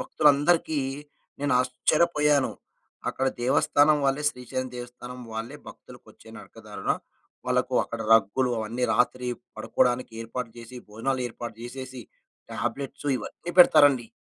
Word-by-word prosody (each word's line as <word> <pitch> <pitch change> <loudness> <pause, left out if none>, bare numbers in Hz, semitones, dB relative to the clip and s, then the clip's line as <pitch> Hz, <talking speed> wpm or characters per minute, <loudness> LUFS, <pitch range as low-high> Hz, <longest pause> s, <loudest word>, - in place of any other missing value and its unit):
భక్తులందరికీ 150 +2 +3 0.6
నేను 145 0 0
ఆశ్చర్యపోయాను, 150 +2 +2 0.6
అక్కడ 135 - -1
దేవస్థానం 145 +4 +4
వాళ్ళే, 135 +2 +1
శ్రీశైలం 130 -1 -5
దేవస్థానం 125 +1 -9
వాళ్ళే, 115 +6 -5
భక్తులకొచ్చే - - -15
నరకదారుణ - - -5 0.5
వాళ్లకు - - 0
అక్కడ 115 - -6
రగ్గులు, 115 +4 +2
అవన్నీ 115 +3 -2
రాత్రి 125 0 +1 0.3
పడుకోడానికి 125 -1 0
ఏర్పాటు 115 +1 -5
జేసి, 120 +2 -10
భోజనాలు 130 +5 -2
ఏర్పాటు 120 0 -8
జేసేసి, 130 +1 -7 0.5
టాబ్లెట్స్ 135 +4 -4
ఇవన్నీ 175 +9 -7
పెడతారండి. 145 -8 +6
125 Hz, 105 wpm, -26 LUFS, 120-145 Hz, 0.6 s, పెడతారండి